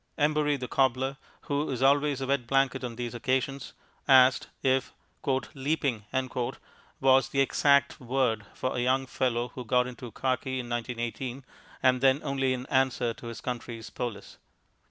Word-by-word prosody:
Embury, 150 -1 +2
the 125 -1 -5
cobbler, 130 +1 +1 0.2
who 145 +1 -1
is 130 -1 -2
always 140 0 +3
a - - -1
wet 130 -3 0
blanket 135 0 +1
on 120 -2 -4
these 120 0 -4
occasions, 130 +2 -1 0.3
asked 130 -2 +6 0.2
if 130 0 +1 0.6
"leaping" 135 -6 -1 0.9
was 135 0 +4
the 135 - -1
exact 140 +1 +3
word 125 -4 0
for 130 - -2
a - - -1
young 130 +2 +2
fellow 125 -2 -1
who 125 - -7
got 125 +1 +2
into 125 -1 -8
khaki 130 +1 -1
in 120 - -5
1918, 120 +2 -4 0.4
and 130 -1 +4
then 135 +1 +4
only 135 -2 0
in 125 0 -2
answer 130 -3 +1
to 115 - -10
his 115 -2 -7
country's 120 -2 -5
police. 115 -5 -6
130 Hz, 155 wpm, -28 LUFS, 125-135 Hz, 0.9 s, asked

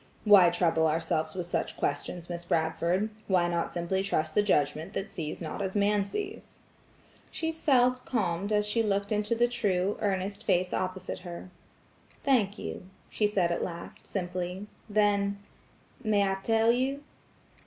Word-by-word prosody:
"Why 200 -4 +8
trouble 165 -2 +2
ourselves 160 0 -1
with 180 -2 -3
such 175 - -2
questions, 175 -1 -2
Miss 175 -1 -5
Bradford? 170 +5 0 0.2
Why 180 -3 +3
not 170 -1 -1
simply 175 +2 -1
trust 160 -5 -1
the 210 - +4
judgment 160 -1 +1
that 195 - -4
sees 155 -4 -4
not 165 +2 -5
as 190 0 -3
man 205 0 +2
sees?" 405 - -6 0.7
She 325 0 -2
felt 255 -5 +2
calmed 200 -4 -1
as 210 0 +2
she 210 +2 +1
looked 200 -1 0
into 210 +2 +1
the 240 +1 +3
true, 200 -5 0
earnest 195 0 -1
face 180 0 +1
opposite 185 0 -3
her. 180 0 -8 0.7
"Thank 225 -7 +2
you," 185 - -6 0.2
she 210 - +2
said 185 -4 +1
at 170 - -1
last, 170 -1 -7
simply. 180 +1 -3 0.2
Then– 200 -1 +2 0.7
"May 210 -2 +3
I 195 0 0
tell 225 +2 +3
you?" 265 +4 -1
195 Hz, 155 wpm, -29 LUFS, 175-210 Hz, 0.7 s, Why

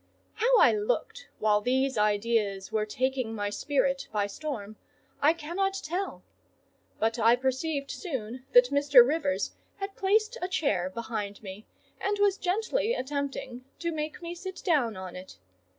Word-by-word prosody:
How - - +3
I - - +7
looked 485 +3 -2
while 210 -1 +3
these 265 +3 +1
ideas 210 -2 +1
were 215 -1 0
taking 255 0 -1
my 205 -1 -2
spirit 275 +2 0
by 210 -2 +1
storm, 215 -2 -5 0.5
I 295 - +6
cannot 345 +5 -2
tell; 375 +2 -4 0.7
but 225 +2 0
I 230 +2 +6
perceived 275 +3 -2
soon 255 - -5
that 245 +1 +7
Mr. 285 -3 +7
Rivers 295 -1 0 0.2
had 390 0 -6
placed 430 +5 +1
a 360 - -1
chair 210 - 0
behind 210 -1 -5
me, 195 +2 -9 0.3
and 410 +1 0
was 405 -1 +2
gently 445 +5 0
attempting 270 -2 -4
to 340 -1 -2
make 310 +2 -4
me 340 0 -4
sit 375 +2 -8
down 265 - +2
on 185 -1 -7
it. 185 +1 -10
270 Hz, 150 wpm, -28 LUFS, 220-350 Hz, 0.7 s, I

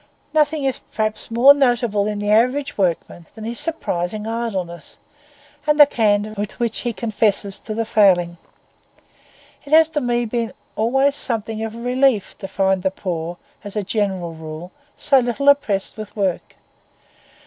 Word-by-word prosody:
Nothing 305 -1 +2
is 265 -2 -1
perhaps 215 -1 -2
more 240 +5 +7
notable 240 -7 +1
in 210 -1 -2
the 205 0 -1
average 250 +6 +2
workman 175 -2 -2
than 220 - -9
his 230 +2 -2
surprising 215 - -2
idleness, 195 -8 -4 0.7
and 300 0 +2
the 295 - +11
candour 215 -5 +1
with 205 +3 -5
which 235 -2 -1
he 240 - -2
confesses 205 -2 -1
to 215 - -6
the 230 0 -1
failing. 180 -6 +3 1.2
It 285 - -6
has 320 0 +7
to 305 -2 -2
me 240 -1 0
been 230 0 -3 0.2
always 270 +6 +2
something 225 -5 -3
of 225 0 -5
a - - -8
relief 250 -3 +1
to 195 - -6
find 190 -1 +1
the 190 - +1
poor, 175 -3 -5 0.3
as 205 -1 -9
a 210 - -1
general 190 -4 -2
rule, 160 +2 -9 0.3
so 275 -3 +4
little 245 +3 -2
oppressed 215 -9 +1
with 215 -1 -8
work. 195 -4 -2
220 Hz, 160 wpm, -20 LUFS, 195-245 Hz, 1.2 s, the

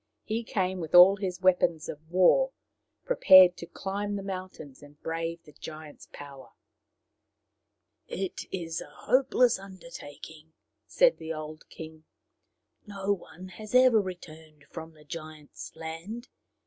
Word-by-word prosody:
He 225 +2 -3
came 190 -4 -2
with 160 0 -3
all 185 +3 +9
his 185 -2 -4
weapons 175 -3 +2
of 155 +1 -9
war, 185 - +4 0.5
prepared 185 - +7
to 170 - -8
climb 200 +3 -4
the 200 - -4
mountains 185 -7 -8
and 145 0 -16
brave 165 +1 -4
the 150 - -16
giant's 155 +1 -11
power. 140 -2 -12 0.8
" - - -54 0.6
It 190 -1 -5
is 165 -3 -4
a - - -10
hopeless 255 -3 +2
undertaking/' 160 - -12 0.3
said - - +4
the 160 - -6
old 155 0 -9
king. 160 -1 -11 0.4
" - - -45
No 195 +1 +1
one 185 0 -10
has 215 +5 -8
ever 250 -4 +6
returned 160 -5 -10
from 160 -1 -8
the 150 - -18
giant's 155 -2 -9
land. 165 +9 -7
175 Hz, 135 wpm, -28 LUFS, 155-195 Hz, 0.8 s, all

